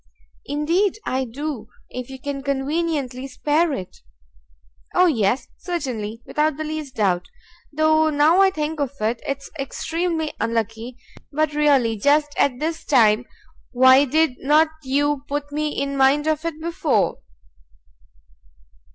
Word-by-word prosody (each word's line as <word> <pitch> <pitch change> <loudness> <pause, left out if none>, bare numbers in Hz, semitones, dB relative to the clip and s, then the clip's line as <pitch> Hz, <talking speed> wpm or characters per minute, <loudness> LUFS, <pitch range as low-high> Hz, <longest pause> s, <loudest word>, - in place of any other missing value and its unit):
"Indeed 335 +9 +1
I 260 +1 -1
do, 260 -2 -5 0.2
if 250 0 -6
you 265 - -8
can 275 +1 -5
conveniently 275 -1 -2
spare 300 +5 +1
it." 185 -9 -6 1.0
"O 365 - +6
yes, 240 - +1
certainly! 240 - -4
without 300 -1 0
the 310 - -3
least 305 -3 -5
doubt! 185 -4 +1 0.4
Though 315 +1 +3
now 310 +5 +4
I 390 - +6
think 315 -3 -3
of 280 -2 -1
it 225 +2 -1
it's 275 0 -4
extremely 320 +3 -2
unlucky, 230 +2 -2 0.3
but 310 +1 0
really 275 -7 +3
just 295 +4 +2
at 260 -3 +2
this 320 +1 -3
time 235 -4 +3 0.5
why 260 +2 +6
did 300 -1 +1
not 305 +3 +4
you 285 +1 0
put 290 0 -4
me 300 0 -2
in 280 0 -2
mind 275 +2 +3
of 310 0 0
it 325 -2 -3
before?" 335 -1 0
285 Hz, 135 wpm, -22 LUFS, 255-310 Hz, 1.0 s, O